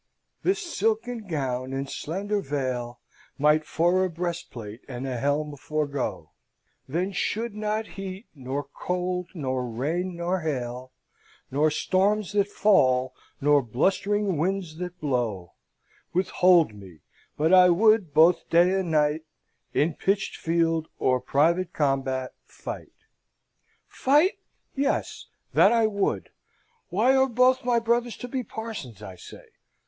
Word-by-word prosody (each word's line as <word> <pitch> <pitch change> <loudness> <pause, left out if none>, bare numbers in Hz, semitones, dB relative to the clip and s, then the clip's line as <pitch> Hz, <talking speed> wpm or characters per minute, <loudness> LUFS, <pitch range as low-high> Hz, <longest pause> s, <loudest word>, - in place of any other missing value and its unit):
this 385 - +2
silken 225 - -2
gown 130 -5 -2
and 135 +1 -3
slender 200 +9 -3
veil 130 -5 -3 0.4
Might 150 +2 +4
for 175 +3 +2
a 185 - 0
breastplate 155 -10 -5
and 125 0 -5
a 130 -2 -3
helm 145 +2 -1
forgo; 145 -1 -3 0.6
Then 175 +8 -1
should 220 +3 -2
not 215 +1 -2
heat, 195 +1 -8
nor 135 0 -4
cold, 180 +5 -3
nor 130 -5 -2
rain, 165 +10 -2
nor 175 +2 -1
hail, 130 -5 -4 0.6
Nor 150 +4 +3
storms 195 +6 +1
that 205 -1 +2
fall, 130 -12 +3 0.3
nor 145 0 +4
blust'ring 190 - 0
winds 180 -2 -2
that 180 0 -6
blow, 120 - -2 0.6
Withhold 180 - +4
me; 95 -7 -13 0.4
but 160 +4 +2
I 180 -1 +8
would, 210 -1 +4
both 165 +4 +4
day 175 +2 +4
and 185 -3 -3
night, 150 0 +2 0.5
In 155 +3 +2
pitched 195 +5 -1
field 165 -1 0
or 130 0 +2
private 170 +7 +1
combat, 135 -3 -1
fight - - -8 0.6
' - - -43 0.2
"Fight? 295 +9 +4 0.3
Yes, 275 0 -1 0.3
that - - +6
I 230 -1 +4
would! 200 -2 -1 0.6
Why 225 +9 +3
are 265 0 +4
both 255 +2 +3
my 245 -1 +2
brothers 235 +1 0
to 245 - -7
be 255 +1 -2
parsons, 205 - -7
I 95 -3 -8
say? - - -12
170 Hz, 130 wpm, -26 LUFS, 135-200 Hz, 0.6 s, I